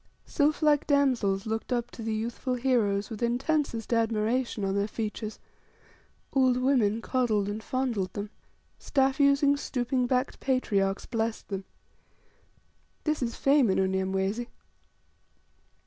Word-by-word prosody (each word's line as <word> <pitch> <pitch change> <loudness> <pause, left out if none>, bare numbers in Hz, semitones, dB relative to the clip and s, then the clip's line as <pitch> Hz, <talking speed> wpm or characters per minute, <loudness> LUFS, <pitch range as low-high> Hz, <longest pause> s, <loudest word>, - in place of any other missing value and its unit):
Sylphlike 300 -1 +2
damsels 250 -9 +2
looked 225 +3 -3
up 240 -1 -1
to - - -9
the 220 -1 -2
youthful 235 +3 -2
heroes 230 -5 +1
with 220 - -6
intensest 245 -1 0
admiration 225 0 0
on 195 - 0
their 200 +1 0
features; 215 0 -4 1.0
old 260 -2 +3
women 235 -4 +2
coddled 225 -6 +1
and 210 +2 -4
fondled 235 -6 -2
them; 205 +1 -5 0.5
staff 270 -1 +1
using, 280 0 +4
stooping 250 -2 -1
backed 255 +2 0
patriarchs 200 -7 0
blessed 225 -1 -3
them. 195 -1 -4 1.4
This 305 -2 0
is 235 -2 -2
fame 275 -4 +3
in 190 - +2
Unyamwezi! 190 +4 0
235 Hz, 120 wpm, -28 LUFS, 210-265 Hz, 1.4 s, using